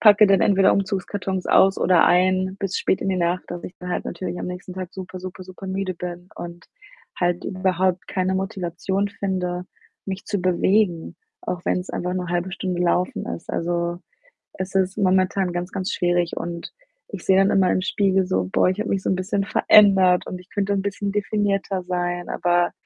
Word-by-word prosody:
packe 210 Hz, -1 st, +7 dB
dann 195 Hz, -2 st, +4 dB
entweder 195 Hz, -1 st, +4 dB
Umzugskartons 195 Hz, -1 st, -2 dB
aus 195 Hz, 0 st, +5 dB
oder 180 Hz, -3 st, +4 dB
ein 185 Hz, +1 st, +2 dB
bis 195 Hz, -1 st, -1 dB
spät -, -, +1 dB
in -, -, -2 dB
die 190 Hz, -, +1 dB
Nacht, 175 Hz, +1 st, 0 dB
dass 175 Hz, 0 st, -6 dB
ich 180 Hz, -, -8 dB
dann 180 Hz, 0 st, -6 dB
halt -, -, -2 dB
natürlich 175 Hz, 0 st, -5 dB
am -, -, -4 dB
nächsten 180 Hz, 0 st, -7 dB
Tag 185 Hz, -2 st, -5 dB
super, 185 Hz, -1 st, -7 dB
super, 185 Hz, 0 st, -8 dB
super 185 Hz, +1 st, -10 dB
müde 190 Hz, 0 st, -2 dB
bin 175 Hz, +1 st, -7 dB
und 170 Hz, 0 st, -8 dB, 0.5 s
halt 175 Hz, 0 st, 0 dB
überhaupt 185 Hz, -1 st, 0 dB
keine 185 Hz, 0 st, 0 dB
Motivation 190 Hz, 0 st, -2 dB
finde, 185 Hz, -3 st, -3 dB, 0.4 s
mich 190 Hz, 0 st, -5 dB
zu 205 Hz, -2 st, -1 dB
bewegen, 185 Hz, 0 st, +1 dB, 0.3 s
auch 180 Hz, -1 st, -4 dB
wenn's 180 Hz, +1 st, -1 dB
einfach 180 Hz, +1 st, -3 dB
nur 180 Hz, -1 st, -3 dB
0,5 175 Hz, +1 st, -1 dB
Stunde 185 Hz, -2 st, -3 dB
laufen 190 Hz, +5 st, 0 dB
ist. 170 Hz, -, -9 dB
Also, 170 Hz, 0 st, -1 dB, 0.6 s
es 185 Hz, 0 st, -5 dB
ist 190 Hz, 0 st, +1 dB
momentan 185 Hz, -1 st, +2 dB
ganz, 175 Hz, +1 st, -3 dB
ganz 190 Hz, -1 st, -3 dB
schwierig 175 Hz, -1 st, 0 dB
und 170 Hz, 0 st, -5 dB, 0.4 s
ich 200 Hz, -5 st, -7 dB
sehe 190 Hz, -, +5 dB
dann 195 Hz, +1 st, +4 dB
immer 190 Hz, -2 st, +3 dB
im -, -, +1 dB
Spiegel 190 Hz, -1 st, +1 dB
so: 95 Hz, -, 0 dB
„Boah, -, -, +3 dB
ich 185 Hz, -, -2 dB
habe 215 Hz, -, -2 dB
mich 195 Hz, -1 st, 0 dB
so -, -, -1 dB
'n 190 Hz, -, +2 dB
bisschen 195 Hz, +2 st, -1 dB
verändert 195 Hz, -4 st, +5 dB
und 180 Hz, -, -5 dB
ich 180 Hz, -, -17 dB
könnte 200 Hz, -1 st, -1 dB
'n 195 Hz, -, 0 dB
bisschen 200 Hz, 0 st, -3 dB
definierter 200 Hz, -2 st, -1 dB
sein,“ 175 Hz, -1 st, -2 dB
aber 175 Hz, 0 st, +1 dB
185 Hz, 190 wpm, -23 LUFS, 180-195 Hz, 0.6 s, packe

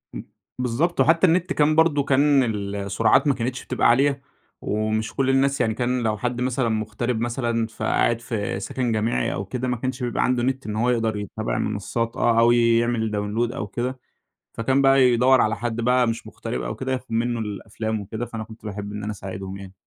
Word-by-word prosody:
امم، -, -, -6 dB, 0.3 s
بالضبط 130 Hz, +8 st, 0 dB
وحتى 165 Hz, +3 st, +5 dB
النت 180 Hz, +2 st, +1 dB
كان 150 Hz, +1 st, +3 dB
برضه 155 Hz, -3 st, +3 dB
كان 140 Hz, 0 st, +4 dB
ال 100 Hz, -3 st, -3 dB
السُرعات 100 Hz, +9 st, +2 dB
ما 140 Hz, -, +4 dB
كانتش 125 Hz, +1 st, -4 dB
بتبقى -, -, +1 dB
عالية، 135 Hz, +3 st, +3 dB, 0.4 s
ومش 110 Hz, +1 st, -1 dB
كل 135 Hz, -1 st, +1 dB
الناس 135 Hz, 0 st, +2 dB
يعني 110 Hz, -2 st, +1 dB
كان 125 Hz, +1 st, -1 dB
لو 110 Hz, -1 st, 0 dB
حد 125 Hz, +3 st, -2 dB
مثلًا 125 Hz, -1 st, 0 dB
مغترب 110 Hz, +2 st, -2 dB
مثلًا، 120 Hz, -2 st, -1 dB
فقاعد 115 Hz, +1 st, 0 dB
في 105 Hz, -4 st, -3 dB
سكن 120 Hz, +3 st, -2 dB
جامعي 110 Hz, +2 st, 0 dB
أو 100 Hz, -, -4 dB
كده، 125 Hz, +4 st, -3 dB
ما 125 Hz, -1 st, -1 dB
كانش 130 Hz, +1 st, -4 dB
بيبقى 120 Hz, -, 0 dB
عنده 125 Hz, -1 st, +1 dB
نت 130 Hz, +1 st, -1 dB
إن 105 Hz, -, -3 dB
هو 120 Hz, +3 st, +1 dB
يقدر 115 Hz, -3 st, 0 dB
يتابع 95 Hz, -11 st, -3 dB
المنصات 115 Hz, 0 st, -2 dB
آه، 115 Hz, -1 st, +3 dB
أو 120 Hz, +1 st, +5 dB
يعمل 115 Hz, -1 st, +2 dB
Download 105 Hz, +4 st, -1 dB
أو 105 Hz, -, -4 dB
كده، 125 Hz, +5 st, -4 dB, 0.5 s
فكان 130 Hz, +4 st, +1 dB
بقى 135 Hz, 0 st, +5 dB
يدور 125 Hz, +1 st, +5 dB
على 110 Hz, +1 st, +1 dB
حد 120 Hz, -1 st, -3 dB
بقى 125 Hz, 0 st, +3 dB
مش 115 Hz, 0 st, -3 dB
مُغترب 65 Hz, -, -5 dB
أو -, -, -4 dB
كده، 130 Hz, 0 st, -4 dB
ياخد 130 Hz, -2 st, -4 dB
منه 120 Hz, +1 st, 0 dB
الأفلام 110 Hz, +1 st, -4 dB
وكده، 110 Hz, +4 st, -5 dB
فأنا 110 Hz, -2 st, -6 dB
كنت 110 Hz, 0 st, -14 dB
باحب 105 Hz, 0 st, -5 dB
إن 105 Hz, 0 st, -6 dB
أنا 105 Hz, -, -3 dB
أساعدهم 95 Hz, -1 st, -7 dB
يعني. 95 Hz, -1 st, -10 dB
120 Hz, 200 wpm, -23 LUFS, 110-130 Hz, 0.5 s, وحتى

